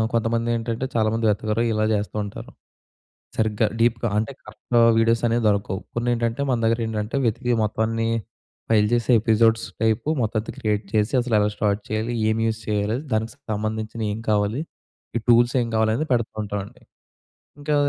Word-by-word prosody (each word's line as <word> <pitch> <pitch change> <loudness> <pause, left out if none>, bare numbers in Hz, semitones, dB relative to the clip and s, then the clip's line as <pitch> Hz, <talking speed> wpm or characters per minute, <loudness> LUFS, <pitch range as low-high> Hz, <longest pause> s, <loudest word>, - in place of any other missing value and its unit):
కొంతమందేంటంటే, 115 +1 0
చాలామంది 110 +1 +1
వెతకరు 110 +2 0
ఇలా 110 0 +1
జేస్తూ 105 +1 -3
ఉంటారు. 100 - -8 0.9
సరిగ్గా 110 0 +1
డీప్‌గా. 115 0 +2
అంటే 110 +5 -1
కరెక్ట్ 110 +3 -7 0.2
వీడియోసనేవి 115 +1 +2
దొరకవు. 100 -2 -1 0.2
కొన్నేంటంటే, 120 +1 0
మన 125 - +2
దగ్గరేంటంటే 115 +1 -1
వెతికి 120 +2 0
మొత్తం 110 +1 0
అన్నీ 115 0 -1 0.6
ఫైల్ 105 -2 +4
చేసే 120 +1 +2
ఎపిసోడ్స్ 115 0 +3 0.2
టైప్ 110 0 +1 0.2
మొత్తం‌త 110 -1 -1
క్రియేట్ 105 -1 -1
చేసి 105 +2 +1
అసలు 120 -2 0
ఎలా 105 0 +2
స్టార్ట్ 105 -1 0
చేయాలి, 110 +2 -1 0.2
ఏమి 110 +1 +1
యూజ్ 110 0 -2
చేయాలి, 105 +2 0 0.2
దానికి 110 0 -1 0.2
సంబంధించినయి 110 +1 -3
ఏం - - -6
కావాలి, 105 +5 +1 0.6
ఈ - - 0
టూల్స్ 120 +2 +5
ఏం 115 - -1
కావాలి, 110 0 +3
అనేది 155 +5 -2
పెడుతూంటామండి. 105 -4 -3 0.8
ఇంకా 150 +1 -1
110 Hz, 145 wpm, -23 LUFS, 105-115 Hz, 0.9 s, టూల్స్